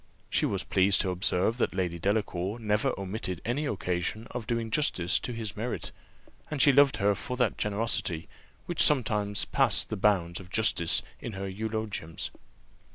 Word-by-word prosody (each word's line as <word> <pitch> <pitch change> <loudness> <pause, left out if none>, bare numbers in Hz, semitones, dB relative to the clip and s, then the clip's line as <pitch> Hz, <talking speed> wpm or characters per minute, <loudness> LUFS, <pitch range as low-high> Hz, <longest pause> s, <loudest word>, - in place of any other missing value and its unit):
She - - +2
was - - -2
pleased 95 +1 +3
to 95 - -1
observe 95 +4 +1
that - - 0
Lady 90 -3 -1
Delacour 100 +1 -1
never 110 +4 +1
omitted 95 -2 -4
any 140 +6 -1
occasion 95 0 -2
of 120 -3 -5
doing 115 -2 -2
justice 95 - +2
to - - -5
his 115 -2 -4
merit, 115 +3 -4 0.6
and 150 - -3
she 145 - +7
loved 140 0 +5
her 100 0 +3
for 125 +5 -5
that 125 -3 +1
generosity, 100 -6 -1 0.4
which 175 - 0
sometimes 105 -7 +3
passed - - +2
the - - -3
bounds 90 -4 +2
of 90 -2 -12
justice 100 -6 +2 0.2
in 120 - -6
her 95 0 -4
eulogiums. 105 -4 -4
105 Hz, 160 wpm, -29 LUFS, 95-115 Hz, 0.6 s, she